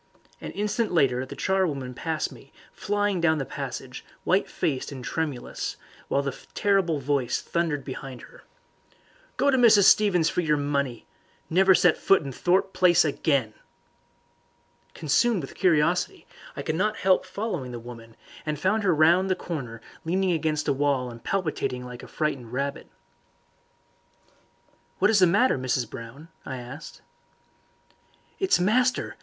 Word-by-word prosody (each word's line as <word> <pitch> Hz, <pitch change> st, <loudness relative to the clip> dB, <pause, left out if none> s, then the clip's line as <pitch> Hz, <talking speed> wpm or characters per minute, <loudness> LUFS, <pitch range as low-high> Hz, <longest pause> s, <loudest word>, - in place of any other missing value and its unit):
An -, -, -6 dB
instant 210 Hz, +2 st, -1 dB
later 130 Hz, -6 st, +2 dB
the 140 Hz, -, -8 dB
charwoman 150 Hz, -8 st, -1 dB
passed 160 Hz, +4 st, -3 dB
me, 135 Hz, -, -15 dB, 0.2 s
flying 205 Hz, -2 st, -1 dB
down 160 Hz, -2 st, +3 dB
the 135 Hz, -, -2 dB
passage, -, -, -6 dB, 0.2 s
white -, -, +1 dB
faced 135 Hz, 0 st, -2 dB
and 130 Hz, -2 st, -8 dB
tremulous, 150 Hz, -6 st, -4 dB, 0.3 s
while 140 Hz, -, 0 dB
the 140 Hz, -1 st, -3 dB, 0.2 s
terrible 195 Hz, -6 st, +2 dB
voice 140 Hz, -2 st, 0 dB
thundered 165 Hz, -4 st, -2 dB
behind 130 Hz, -2 st, -7 dB
her. -, -, -15 dB, 0.9 s
"Go 280 Hz, -, +3 dB
to 265 Hz, -, +3 dB
Mrs. 220 Hz, -4 st, +6 dB
Stevens 185 Hz, -5 st, +5 dB
for 180 Hz, -, 0 dB
your 150 Hz, -3 st, +1 dB
money! 140 Hz, -4 st, -2 dB, 0.5 s
Never 190 Hz, +2 st, +5 dB
set 175 Hz, -2 st, +3 dB
foot 195 Hz, -4 st, +3 dB
in 140 Hz, -, -5 dB
Thorpe 185 Hz, +7 st, +1 dB
Place 175 Hz, -3 st, +4 dB
again!" 140 Hz, -6 st, 0 dB, 1.4 s
Consumed 180 Hz, -, +1 dB
with 135 Hz, -, -8 dB
curiosity, 180 Hz, -, +1 dB, 0.3 s
I -, -, -4 dB
could 155 Hz, -, -1 dB
not 210 Hz, +6 st, 0 dB
help 190 Hz, -1 st, +3 dB
following 180 Hz, -, -4 dB
the 120 Hz, -, -5 dB
woman, 115 Hz, -1 st, -11 dB, 0.3 s
and 155 Hz, -1 st, -3 dB
found 200 Hz, +6 st, +1 dB
her 185 Hz, -5 st, +2 dB
round 170 Hz, +5 st, +4 dB
the 185 Hz, -, +2 dB
corner 130 Hz, -12 st, -6 dB, 0.2 s
leaning 185 Hz, +3 st, +1 dB
against 155 Hz, -2 st, 0 dB
the -, -, +2 dB
wall 135 Hz, -3 st, 0 dB
and 115 Hz, 0 st, -12 dB
palpitating 155 Hz, -9 st, -2 dB
like 125 Hz, -1 st, -9 dB
a -, -, -11 dB
frightened 140 Hz, -7 st, -3 dB
rabbit. 140 Hz, +2 st, -3 dB, 2.1 s
"What -, -, +3 dB
is 215 Hz, -, +4 dB
the 185 Hz, -, +6 dB
matter, 205 Hz, -, +3 dB
Mrs. 130 Hz, -1 st, -1 dB
Brown?" 115 Hz, +9 st, -10 dB
I 130 Hz, -, -6 dB
asked. 125 Hz, +5 st, -10 dB, 1.4 s
"It's 385 Hz, -, +3 dB
master!" 245 Hz, +7 st, +1 dB
155 Hz, 150 wpm, -26 LUFS, 135-190 Hz, 2.1 s, Mrs